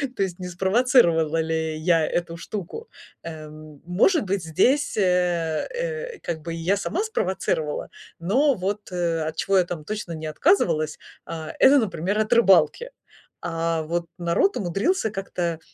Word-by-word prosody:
то - - +1
есть 185 -2 -4
не 180 - -5
спровоцировала 180 - +3
ли 160 -1 -2
я 165 -1 +3
эту 170 -1 -2
штуку, 210 - -7 0.4
эм. 155 -2 -10
Может 225 - +3
быть, 195 0 -1
здесь, 260 - +2
э, 180 -4 +1
э, 485 -2 -4
как 165 -2 -4
бы 165 - -5
и - - -6
я 180 +5 +1
сама 335 - -2
спровоцировала, 185 - -2 0.3
но 255 - +3
вот, 200 +2 -3
э, 170 -2 -1
от 155 - -4
чего 195 0 +2
я 180 - +4
там 170 -3 -6
точно 210 -4 -5
не 160 -1 -5
отказывалась, 155 - +1 0.3
а, 160 -1 -6
это, 275 +2 +7
например, 205 -2 -1
от 215 0 0
рыбалки. 225 - +4 0.6
А 165 -1 -1
вот 170 +2 -2
народ 175 - +1
умудрился 215 - 0
как-то 175 -5 -3
180 Hz, 155 wpm, -24 LUFS, 165-215 Hz, 0.6 s, это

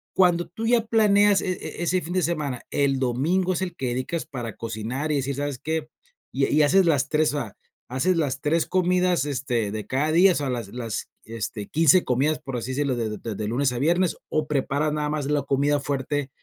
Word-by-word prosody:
cuando 175 -2 +3
tú 225 +5 -5
ya 235 -2 +3
planeas 205 -3 +4
e 185 - -1
e 175 - -7
ese 180 +1 +1
fin 175 +3 -5
de 185 - +2
semana, 150 -6 -2
el 135 -2 +1
domingo 165 +10 +1
es 180 - -3
el 180 - -5
que 130 - -2
dedicas 130 +7 -2
para 120 -7 -6
cocinar, 115 +6 -3
y 150 - +1
decir, 140 0 -1
¿sabes 145 -2 -3
qué?, 160 -1 -2 0.5
y 135 0 +2
y 155 - +3
haces 185 +6 +4
las 145 -4 +2
3 155 -1 +2
o 145 - -1
sea, 110 -4 -8 0.3
haces 150 +9 +1
las 140 -5 -1
3 160 +2 +1
comidas, 180 -3 +2
este, 125 -7 -1
de 105 -1 -5
cada 145 +4 0
día, 180 +3 +6
o - - -4
sea, 140 -2 -1
las 120 -5 -3
las, 115 -3 -5 0.2
este, 110 -1 -5
15 165 +3 +4
comidas, 145 +5 +1
por 135 -5 -5
así 125 +3 -4
decirlo, 140 -2 0
de 115 -2 -2
de 105 - -5
de 115 -2 -5
de 105 - -3
lunes 125 +4 +1
a 120 - -3
viernes, 175 +4 +2
o 155 -1 0
preparas 150 +1 0
nada 150 -1 -1
más 150 -2 -2
la 145 0 +1
comida 140 +2 +1
fuerte 140 0 -2
145 Hz, 225 wpm, -24 LUFS, 130-170 Hz, 0.5 s, día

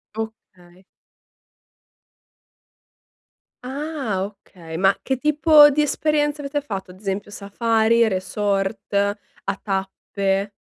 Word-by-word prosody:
Okay. 190 -5 -9 2.8
Ah, 265 -7 -3
okay. 180 -5 -10
Ma 195 +1 +4
che 265 -1 -1
tipo 300 +1 +6
di 300 +2 +1
esperienze 295 0 0
avete 290 +1 -2
fatto? 195 -8 -6
Ad 185 - -16
esempio 200 0 -4
Safari, 225 +3 +2
resort, 195 +1 -2
a 200 0 -2
tappe? 195 0 -2
205 Hz, 90 wpm, -22 LUFS, 195-275 Hz, 2.8 s, tipo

